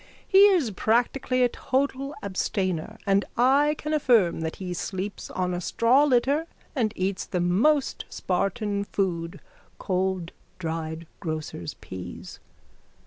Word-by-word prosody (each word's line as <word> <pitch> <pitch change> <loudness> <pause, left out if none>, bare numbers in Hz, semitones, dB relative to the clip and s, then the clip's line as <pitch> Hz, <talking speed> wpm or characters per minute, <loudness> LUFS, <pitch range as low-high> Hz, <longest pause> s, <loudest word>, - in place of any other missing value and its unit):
He 395 +1 +8
is 345 - +2
practically 245 +5 +1
a 245 - +4
total 275 +3 -1
abstainer 190 0 -2
and 200 0 +3
I 280 +5 +4
can 305 +1 -3
affirm 235 - +3
that 160 0 -3
he 185 -2 -5
sleeps 190 +3 -4
on 180 -1 -1
a 175 - -2
straw 245 - +3
litter 280 +4 +2 0.3
and 230 -6 +1
eats 190 +1 -1
the 180 - -1
most 230 - +2
Spartan 200 +2 -1
food, 170 -5 -2 0.4
cold 185 -2 -1 0.3
dried 160 -1 -4
grocer's 155 - -5
peas. 90 -1 -9
200 Hz, 125 wpm, -26 LUFS, 180-260 Hz, 0.4 s, He